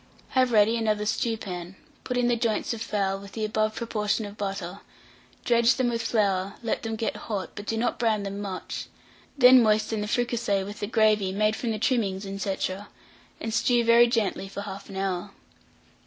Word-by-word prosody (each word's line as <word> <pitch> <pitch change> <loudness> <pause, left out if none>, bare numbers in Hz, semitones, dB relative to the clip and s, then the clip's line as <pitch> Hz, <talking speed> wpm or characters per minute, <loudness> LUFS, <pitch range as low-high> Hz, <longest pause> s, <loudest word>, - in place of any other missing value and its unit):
Have 255 -2 +2
ready 220 +1 +4
another 215 -2 0
stewpan; 200 -5 -3 0.3
put 250 - -2
in 245 -1 +2
the 240 - +3
joints 230 0 0
of 225 - -7
fowl, 195 -3 -1
with 200 0 -12
the 220 -1 -2
above 215 0 0
proportion 215 -2 -1
of 205 0 -9
butter; 195 -2 -4 0.7
dredge 235 +1 +4
them 255 -2 +1
with 230 -1 -1
flour, 200 -4 0
let 225 - -1
them 225 -1 -3
get 220 0 -2
hot, 200 -4 -4
but 205 0 -8
do 225 - -1
not 240 +2 -1
brown 220 -3 +1
them 200 0 -5
much; 195 -3 -5 0.5
then 255 -1 +8
moisten 215 0 +2
the 210 - -3
fricassee 235 -4 0
with 205 +2 -8
the 205 - -3
gravy 215 -3 +3
made 215 +2 +1
from 235 - -3
the 220 - -1
trimmings, 210 -4 0 0.2
&c., 195 -1 -2 0.8
and 225 - -4
stew 235 +1 +3
very 235 +1 +6
gently 225 -4 -1
for 200 +1 -6
1/2 195 -1 -8
hour. 190 0 -2
215 Hz, 185 wpm, -26 LUFS, 200-230 Hz, 0.8 s, then